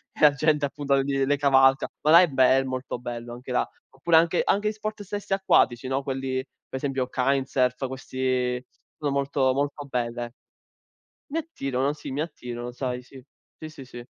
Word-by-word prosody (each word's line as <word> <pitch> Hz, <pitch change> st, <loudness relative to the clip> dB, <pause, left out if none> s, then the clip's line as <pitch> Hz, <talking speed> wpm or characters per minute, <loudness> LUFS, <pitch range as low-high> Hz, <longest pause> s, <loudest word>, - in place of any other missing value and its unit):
e -, -, -11 dB
la 150 Hz, -, +8 dB
gente 150 Hz, +1 st, +2 dB
appunto 140 Hz, 0 st, 0 dB
li 135 Hz, 0 st, +1 dB
le 145 Hz, +1 st, +2 dB
cavalca. 135 Hz, -1 st, +4 dB
Ma 155 Hz, -, +3 dB
là 170 Hz, +2 st, +10 dB
è 180 Hz, -, +4 dB
be 130 Hz, -2 st, +4 dB
è 135 Hz, -, +2 dB
molto 130 Hz, -1 st, -4 dB
bello 120 Hz, -1 st, -6 dB
anche 125 Hz, +2 st, -8 dB
là. 125 Hz, -, +1 dB, 0.2 s
Oppure 160 Hz, +5 st, +2 dB
anche 170 Hz, +2 st, +3 dB
anche 205 Hz, +2 st, +1 dB
gli -, -, -1 dB
sport 215 Hz, 0 st, -5 dB
stessi 205 Hz, 0 st, -4 dB
acquatici, 130 Hz, -10 st, +2 dB
no? 135 Hz, +1 st, 0 dB
Quelli 135 Hz, -1 st, -3 dB, 0.3 s
per -, -, -5 dB
esempio 135 Hz, -2 st, -1 dB
Kitesurf 130 Hz, 0 st, 0 dB
questi 130 Hz, -1 st, -2 dB, 0.3 s
sono 145 Hz, -2 st, -2 dB
molto 140 Hz, -1 st, +1 dB
molto 145 Hz, +1 st, -2 dB
belle. 120 Hz, -2 st, -3 dB, 1.0 s
Mi 325 Hz, -, 0 dB
attirano, 135 Hz, -, -2 dB
sì, 150 Hz, -, -8 dB
mi 140 Hz, +3 st, -2 dB
attirano, 125 Hz, -6 st, -6 dB
sai, 125 Hz, 0 st, -3 dB
sì. 130 Hz, +1 st, -14 dB, 0.3 s
Sì, 155 Hz, -, -8 dB
sì, 140 Hz, -4 st, -11 dB
sì. 120 Hz, -1 st, -10 dB
135 Hz, 180 wpm, -26 LUFS, 130-145 Hz, 1.0 s, là